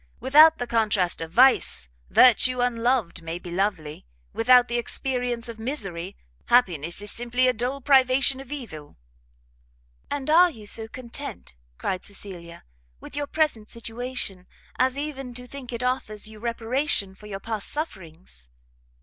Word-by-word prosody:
Without 305 +5 +6
the 245 - -3
contrast 210 -8 +1
of 165 0 -6
vice, 245 - +4 0.2
virtue 255 +1 +5
unloved 240 -6 0
may 165 +1 -5
be 175 0 -10
lovely; 170 - -2 0.3
without 245 +1 +5
the 240 0 -1
experience 245 -1 -2
of 230 -1 -8
misery, 195 - -3 0.3
happiness 175 - +2
is 205 - +3
simply 245 +2 +1
a 255 - +3
dull 250 +5 -3
privation 265 0 +3
of 270 0 -11
evil." 195 - -8 1.1
"And 280 -2 -4
are 345 +4 +6
you 220 -10 -12
so 220 +2 -1
content," 255 - -8 0.2
cried 185 -1 -3
Cecilia, 180 -4 -9 0.4
"with - - -11
your 290 0 -2
present 295 -9 -1
situation, 230 -5 -6 0.3
as 260 +1 +2
even 270 -4 -5
to 250 0 -9
think 255 -1 -9
it 235 0 -4
offers 250 -5 -2
you 220 -1 -12
reparation 235 -2 -1
for 210 +2 -14
your 195 -2 -6
past 220 0 -4
sufferings?" 170 - -7
235 Hz, 145 wpm, -25 LUFS, 195-260 Hz, 1.1 s, Without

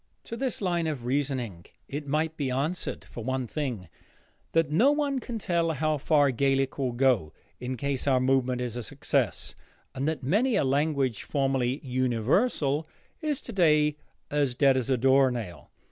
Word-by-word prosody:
To 230 - -6
this 250 -3 -2
line 175 -3 0
of 140 -6 -4
reasoning 125 -9 -2 0.2
it 145 +1 -5
might 155 +3 0
be 140 -4 -2
answered, 145 +8 -2
for 115 - -8
one 130 +1 -1
thing, 120 - -4 0.7
that 165 -3 +2
no 230 - +5
one 290 -2 0
can 240 -2 -5
tell 170 -5 0
how 155 +1 0
far 145 -1 +3
Gaelic 135 +2 +1
will 130 -2 0
go, 120 - +2 0.3
in 125 +1 -4
case 140 +1 -2
our 130 -2 +4
movement 130 -1 +1
is 120 -2 -3
a 120 - -3
success, 110 - -1 0.4
and 135 +2 -2
that 155 -4 -2
many 215 - +2
a - - +3
language 140 -4 +1
formerly 135 -2 0
"universal" 135 - +1 0.3
is 300 -3 -1
today 155 -8 +2 0.4
as 140 -4 +1
dead 135 0 +4
as 130 -1 -1
a 130 - +3
door 135 +2 +5
nail. 115 -8 -6
140 Hz, 165 wpm, -27 LUFS, 130-160 Hz, 0.7 s, no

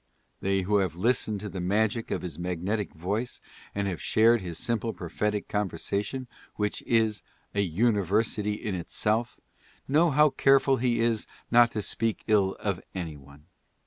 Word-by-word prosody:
They 95 0 +1
who 100 +3 +2
have 95 -5 0
listened 110 +1 +1
to 105 - -5
the 95 - -6
magic 110 +5 0
of - - -2
his 90 -2 -5
magnetic 90 +4 -2
voice 100 +9 -3 0.4
and 100 0 0
have 90 -3 -3
shared 115 +1 +4
his 85 -3 -5
simple 115 0 -1
prophetic 105 +4 -2
conversation, 105 +5 -2 0.3
which 105 -1 -1
is 110 -4 +2 0.3
"a 100 - +1
uni 100 +4 +2
versity 105 +2 0
in 105 - -3
itself," 105 +6 -1 0.5
know 155 +5 +4
how 150 0 +5
careful 135 0 +4
he 120 -1 +1
is 115 -2 +1 0.2
not 120 0 +7
to 105 - -2
speak 115 +2 -1
ill 100 -3 +2
of 100 -4 -2
any 85 -4 -4
one. 70 +1 -16
105 Hz, 160 wpm, -27 LUFS, 95-115 Hz, 0.5 s, not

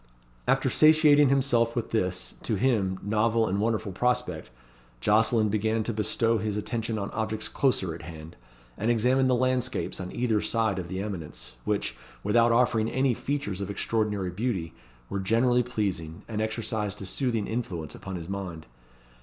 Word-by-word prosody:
After - - +3
satiating 155 -2 +6
himself 125 -4 +2
with 120 -2 -2
this, 90 -4 -1
to 110 - -1
him, 100 -4 +1
novel 110 +2 +2
and 100 0 0
wonderful 110 -2 0
prospect, 125 +7 -1 0.5
Jocelyn 110 - +3
began 110 +2 0
to 115 - -2
bestow 110 +2 +1
his 105 -1 -2
attention 115 +1 -2
on 100 -1 -3
objects 110 -1 -2
closer 95 -11 0
at 85 - -9
hand, 80 0 -10 0.4
and 110 +4 0
examined 125 +3 +3
the 125 - +4
landscapes 130 -2 0
on 90 - -6
either 115 -4 +1
side 110 -4 0
of 90 - -5
the 95 +2 -3
eminence, 75 -11 -6
which, 105 -1 -1 0.3
without 115 +2 +4
offering 115 -2 +3
any 130 -1 +2
features 125 -7 -3
of 100 - -4
extraordinary 105 -3 -1
beauty, 95 -5 -2 0.3
were 100 - -3
generally 120 +5 +3
pleasing, 95 -9 -3
and 110 -2 -3
exercised 110 -2 -2
a - - -6
soothing 115 +1 -1
influence 95 -10 -4
upon 95 -1 -7
his 85 -2 -6
mind. 90 -5 -5
110 Hz, 160 wpm, -27 LUFS, 95-120 Hz, 0.5 s, satiating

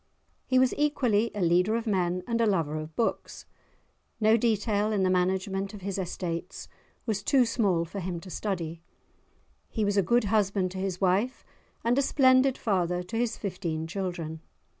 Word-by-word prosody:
He 255 - +2
was 255 0 +4
equally 245 -7 +2
a 205 - -2
leader 180 +5 +3
of 230 0 -2
men 180 -4 0
and 230 -1 0
a 230 - +3
lover 165 -7 0
of 155 0 -6
books; 230 - -2 0.7
no 220 0 +5
detail 215 -2 +1
in 200 -3 +1
the 185 - +2
management 190 +2 0
of 200 - -10
his 195 +1 -3
estates 175 -1 -4 0.4
was 215 -3 -1
too 255 +5 +3
small 195 -8 +1
for 195 +4 -6
him 175 -2 -4
to 185 - -10
study; 170 -6 -3 0.9
he 220 -3 -1
was 205 0 0
a - - +6
good 240 +6 +2
husband 200 -3 +1
to 190 - -6
his 190 -2 -3
wife, 200 +7 +1 0.4
and 240 +3 +2
a - - +4
splendid 260 -1 +4
father 180 -4 0
to 185 +5 -8
his 235 0 0
fifteen 170 -5 -3
children. 170 -3 -4
195 Hz, 175 wpm, -28 LUFS, 180-225 Hz, 0.9 s, a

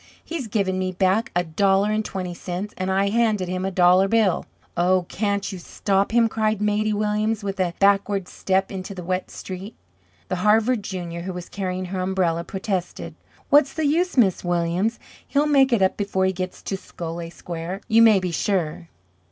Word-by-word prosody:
"He's 320 -7 -4
given 195 -3 0
me 185 0 -1
back 190 +4 +1
a 175 - +2
dollar 195 +5 +2
and 215 0 0
twenty 185 -3 -4
cents, 180 +4 -5
and 185 0 -3
I 195 +1 +2
handed 215 -4 +1
him 185 +1 -3
a 190 - 0
dollar 185 +1 +4
bill." 215 -3 +2 0.3
"Oh, 180 +1 +2
can't 200 0 -1
you 190 - -7
stop 195 +2 0
him?" 235 0 +4
cried 220 -1 0
Maidie 210 +1 +1
Williams, 210 +1 0
with 195 -1 -4
a 175 -2 0
backward 200 -1 +2
step 190 0 -1
into 190 0 -6
the 180 - -7
wet 185 +1 -2
street. 190 +4 -8 0.5
The 185 - -2
Harvard 215 +4 +3
junior, 175 -3 -5
who 185 +2 -5
was 180 -1 -7
carrying 185 -2 -3
her 185 +1 -4
umbrella, 185 -3 0
protested: 190 -1 -4 0.4
"What's 285 -1 +5
the 315 -1 -1
use. 335 +3 +1
Miss 195 -7 +3
Williams? 175 +5 0 0.3
He'll 290 +1 +2
make 275 -3 +4
it 225 -5 +3
up 190 - +1
before 200 -2 0
he 190 - +1
gets 185 0 -5
to 195 - -3
Scollay 170 -2 -7
Square, 170 +3 -6
you 225 0 +5
may 220 -3 +7
be 180 -1 -3
sure. 170 -2 -1
195 Hz, 185 wpm, -23 LUFS, 180-215 Hz, 0.5 s, may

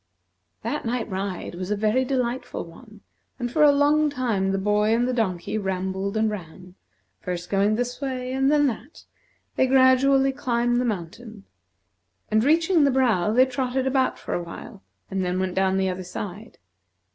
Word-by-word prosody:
That - - -3
night 235 0 -2
ride 190 -2 -4
was 180 +2 -6
a 210 - +1
very 215 +5 +1
delightful 250 -3 -2
one, 210 +5 -15 0.4
and 245 -2 -4
for 305 - 0
a 295 -1 +8
long 295 +2 +3
time 230 -8 -1
the 195 - 0
boy 210 +2 +2
and 240 +1 +1
the 255 - -1
donkey 210 -3 -1
rambled 190 +1 -2
and 220 0 +2
ran; 180 -3 -7 0.5
first 180 -1 -5
going 200 +2 +2
this 245 +3 -3
way 255 -2 -3
and 270 +1 +2
then 295 -1 +4
that, 255 +3 -5 0.5
they 260 - +3
gradually 265 +1 +4
climbed 240 -2 0
the - - -1
mountain; 215 +1 -5 0.9
and, 215 +1 +3
reaching 320 +3 +3
the 280 - +4
brow, 235 -8 +2
they 250 +4 +5
trotted 260 0 -2
about 265 0 +1
for - - -6
a 175 - -1
while, 190 +4 -10 0.3
and 190 -1 -1
then 180 0 -1
went 185 -1 -1
down 190 0 +1
the 190 0 +1
other 185 0 -4
side. 195 +4 -8
225 Hz, 175 wpm, -24 LUFS, 190-260 Hz, 0.9 s, a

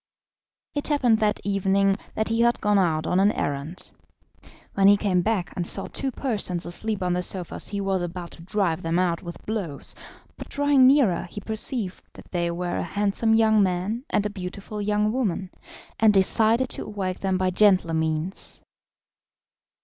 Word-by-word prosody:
It 290 - -3
happened 250 -7 +2
that 210 -1 +1
evening 195 0 +2 0.2
that 220 - -1
he 225 +1 +1
had 235 0 +3
gone 210 -1 +2
out 160 -4 +1
on 180 - +1
an 200 +2 +4
errand. 145 +5 -4 0.8
When 195 -1 +4
he 205 0 +7
came 190 -3 +1
back 195 -2 -1
and 175 -2 0
saw - - +2
two 275 - -3
persons 210 -9 -2
asleep 205 +3 -1
on 180 -1 0
the 180 - 0
sofas 180 -1 -2
he 205 - -3
was 195 -2 0
about 175 0 -6
to - - -13
drive 185 -2 -1
them 165 +1 -1
out 175 -2 0
with 170 -1 -10
blows, 195 -10 -4 0.4
but - - -9
drawing 285 -2 +4
nearer 255 -13 +3
he 205 - -7
perceived 220 -1 -2
that - - -15
they 175 -1 -1
were 175 +1 -3
a - - -1
handsome 205 +4 +1
young 220 -1 +4
man 190 +5 -1
and 210 0 0
beautiful 200 +2 -6
young 210 +1 +1
woman, 200 -7 -2 0.5
and 215 -2 +5
decided 225 +6 +3
to - - -4
awake 195 -3 -4
them 190 -1 0
by 185 0 0
gentler 185 -4 +3
means. 160 +3 -2
195 Hz, 170 wpm, -24 LUFS, 180-220 Hz, 0.8 s, he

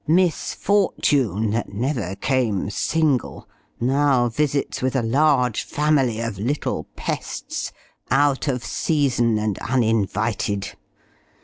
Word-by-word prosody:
Miss 170 0 +2
Fortune, 135 - +1
that 115 +2 -2
never 110 -3 -2
came 110 -6 0
single, 150 -1 0 0.3
now 130 -1 +2
visits 140 +3 -1
with 130 +1 0
a 130 - +1
large 125 -1 +2
family 145 -6 +1
of 115 -5 -4
little 135 +8 -2
pests - - -4 0.4
out 140 +1 +2
of 125 -4 -1
season 125 -7 +1
and 105 -2 -1
uninvited! 110 -4 0
125 Hz, 105 wpm, -22 LUFS, 110-145 Hz, 0.4 s, Miss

